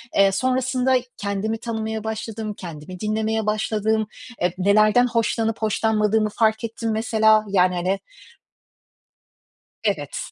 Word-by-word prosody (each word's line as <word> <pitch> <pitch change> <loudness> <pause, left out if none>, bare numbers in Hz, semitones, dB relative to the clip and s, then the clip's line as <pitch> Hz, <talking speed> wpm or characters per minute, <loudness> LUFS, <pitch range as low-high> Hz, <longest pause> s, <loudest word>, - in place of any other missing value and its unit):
eee, 195 0 +5
sonrasında 255 +3 +1 0.2
kendimi 200 +2 -2
tanımaya 220 -1 -4
başladım, 220 0 -4
kendimi 170 +1 -8
dinlemeye 220 0 -1
başladım, 215 0 0 0.3
e, 180 0 +2
nelerden 215 +5 +4
hoşlanıp 225 -1 0
hoşlanmadığımı 215 0 +1
fark 220 +1 +1
ettim 230 0 -3
mesela 220 -1 +3
yani, 180 -2 +3
hani. 185 +3 0 1.8
Evet, - - -1
220 Hz, 105 wpm, -22 LUFS, 205-225 Hz, 1.8 s, eee